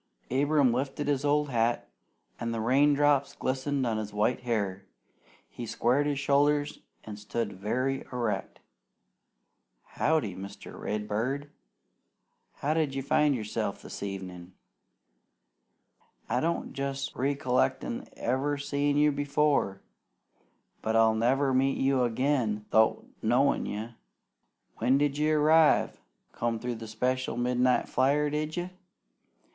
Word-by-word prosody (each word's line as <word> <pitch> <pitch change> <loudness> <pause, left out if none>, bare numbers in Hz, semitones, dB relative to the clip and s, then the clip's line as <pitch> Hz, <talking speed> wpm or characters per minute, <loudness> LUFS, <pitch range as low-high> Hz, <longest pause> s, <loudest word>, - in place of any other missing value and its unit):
Abram 140 -1 +3
lifted 135 +3 -2
his 140 -1 0
old 145 0 +2
hat, 115 - +1 0.5
and 115 0 -2
the 115 - -2
raindrops 140 +3 +3
glistened 135 +1 -1
on 115 -2 0
his 105 -1 -5
white 105 +5 +1
hair. 100 -6 -2 0.6
He 120 - -8
squared 130 +7 +1
his 145 -1 0
shoulders 145 +1 +2 0.2
and 105 -1 -8
stood 105 0 -3
very 130 +6 -1
erect. 120 -4 -3 1.2
"Howdy, 150 - 0
Mr. 100 +1 -9
Redbird! 110 +7 -3 1.0
How 150 +2 -1
d'ye 150 -4 0
find 150 0 +3
yerself 110 -3 -3
this - - -8
evenin'? 95 -2 -6 1.7
I 125 +3 0
don't 165 +4 -2
jest 140 0 -3
riccolict 130 -1 0 0.3
ever 135 +4 0
seein' 145 0 0
you 150 0 +4
before, 145 -7 +1 1.0
but 110 0 -1
I'll 115 0 +5
never 130 +5 +2
meet 135 +1 +2
you 135 -1 +2
agin 120 -3 0
'thout 110 0 +3 0.2
knowin' 125 +5 +2
you. 110 +3 -4 0.9
When 130 +2 +3
d'you 145 +2 +1
arrive? 155 +1 +4 0.3
Come 115 -1 -2
through 125 +2 -3
by - - -12
the 115 - -7
special 125 +4 -1
midnight 125 +1 +2
flyer, 145 +3 +2
did 155 +2 -2
you? 175 +1 -3
130 Hz, 120 wpm, -28 LUFS, 115-145 Hz, 1.7 s, I'll